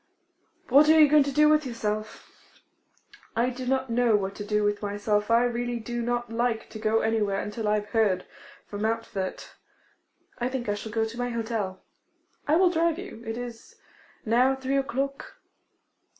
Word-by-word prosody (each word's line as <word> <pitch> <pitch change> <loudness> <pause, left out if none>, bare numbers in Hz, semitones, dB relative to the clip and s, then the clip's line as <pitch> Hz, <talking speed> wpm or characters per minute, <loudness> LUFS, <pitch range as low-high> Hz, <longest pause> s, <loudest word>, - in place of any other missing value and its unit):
What 285 +4 +6
are 315 0 +7
you 305 - +8
going 300 +1 +5
to 280 0 0
do 300 +2 +5
with 305 0 +4
yourself?' 215 -4 -4 1.1
'I 240 +3 +1
do 255 0 -6
not 260 -1 0
know 235 -2 +3
what 195 -1 -1
to 205 - -5
do 210 0 0
with 205 0 0
myself. 210 +1 -1
I 230 +1 +5
really 240 0 -1
do 240 +1 -4
not 240 0 -2
like 235 -1 -1
to 220 - -8
go 220 +1 +1
anywhere 210 -3 0
until 210 +1 -4
I 210 - +3
have 210 0 -3
heard 205 -5 +1 0.4
from 205 0 -7
Montfort. 220 -4 -3 0.9
I 245 +1 0
think 255 -3 -4
I 205 - +1
shall 205 +1 -6
go 225 0 +1
to 225 +1 -7
my 245 0 -1
hotel' 220 -5 -3 0.6
'I 300 - +4
will 360 +1 +4
drive 335 -1 +1
you. 370 - -9
It 225 +1 -3
is 240 -2 -8 0.5
now 250 +4 +3
three 265 +1 -1
o'clock. 275 0 -3
235 Hz, 180 wpm, -26 LUFS, 215-260 Hz, 1.1 s, you